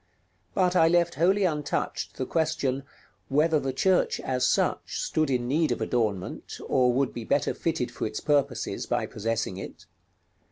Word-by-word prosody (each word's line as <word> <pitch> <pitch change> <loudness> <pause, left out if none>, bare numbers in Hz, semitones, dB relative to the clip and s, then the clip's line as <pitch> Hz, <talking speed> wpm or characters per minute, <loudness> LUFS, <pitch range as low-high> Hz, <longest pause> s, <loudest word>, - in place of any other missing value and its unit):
But 185 -1 +2
I 165 -2 +6
left 170 0 +3
wholly 190 +5 +3
untouched 150 -4 -2
the 130 - -2
question: 155 -4 0 0.5
whether 155 +3 +3
the 135 -1 -2
church, 180 +8 +2
as 125 -1 0
such, - - 0
stood 155 -2 0
in 125 -2 0
need 155 +4 +2
of - - -1
adornment, 105 -6 -2
or 125 -1 +3
would 135 +2 0
be 120 - -5
better 140 +6 +1
fitted 160 -7 -2
for - - -3
its 110 - -5
purposes 145 -2 0
by - - 0
possessing 115 -3 -2
it. 95 - -9
140 Hz, 160 wpm, -27 LUFS, 125-165 Hz, 0.5 s, I